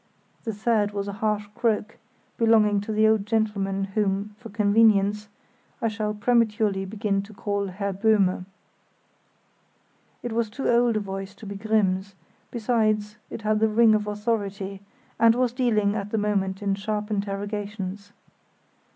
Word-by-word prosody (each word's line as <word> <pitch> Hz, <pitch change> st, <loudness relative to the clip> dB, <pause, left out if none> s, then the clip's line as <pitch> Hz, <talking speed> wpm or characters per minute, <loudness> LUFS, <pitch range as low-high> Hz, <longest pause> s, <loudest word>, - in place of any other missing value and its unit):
The 225 Hz, -, -1 dB
third 210 Hz, -1 st, +1 dB
was 200 Hz, 0 st, -3 dB
a 200 Hz, -, -4 dB
harsh 210 Hz, -1 st, 0 dB
croak, 225 Hz, -2 st, -1 dB, 0.4 s
belonging 215 Hz, -3 st, +4 dB
to 205 Hz, -, -5 dB
the 215 Hz, 0 st, +4 dB
old 220 Hz, -2 st, +3 dB
gentleman 205 Hz, -3 st, 0 dB
whom, 205 Hz, 0 st, 0 dB
for 235 Hz, -2 st, -10 dB
convenience, 210 Hz, -1 st, +3 dB, 0.5 s
I 230 Hz, -4 st, +1 dB
shall 215 Hz, -1 st, -3 dB
prematurely 215 Hz, -3 st, +1 dB
begin 200 Hz, 0 st, -1 dB
to 205 Hz, +1 st, -13 dB
call 200 Hz, 0 st, -2 dB
Herr 200 Hz, +1 st, -3 dB
Böhme. 195 Hz, -3 st, +2 dB, 1.8 s
It 240 Hz, -, -3 dB
was 225 Hz, -1 st, 0 dB
too 265 Hz, +6 st, -4 dB
old 235 Hz, -1 st, +3 dB
a -, -, +2 dB
voice 195 Hz, 0 st, -6 dB
to 215 Hz, -, -12 dB
be 200 Hz, -, -5 dB
Grimm's; 200 Hz, -2 st, 0 dB, 0.3 s
besides, 215 Hz, -3 st, 0 dB
it 220 Hz, -, -7 dB
had 215 Hz, 0 st, +2 dB
the 220 Hz, 0 st, +3 dB
ring 220 Hz, +1 st, +5 dB
of 210 Hz, -1 st, 0 dB
authority, 205 Hz, -2 st, -3 dB, 0.4 s
and 230 Hz, 0 st, +6 dB
was 250 Hz, -1 st, +1 dB
dealing 215 Hz, -5 st, +1 dB
at 205 Hz, -1 st, -3 dB
the 220 Hz, -, -1 dB
moment 200 Hz, -2 st, -1 dB
in 200 Hz, -1 st, +1 dB
sharp 210 Hz, +1 st, -3 dB
interrogations. 205 Hz, 0 st, -4 dB
210 Hz, 150 wpm, -25 LUFS, 200-220 Hz, 1.8 s, and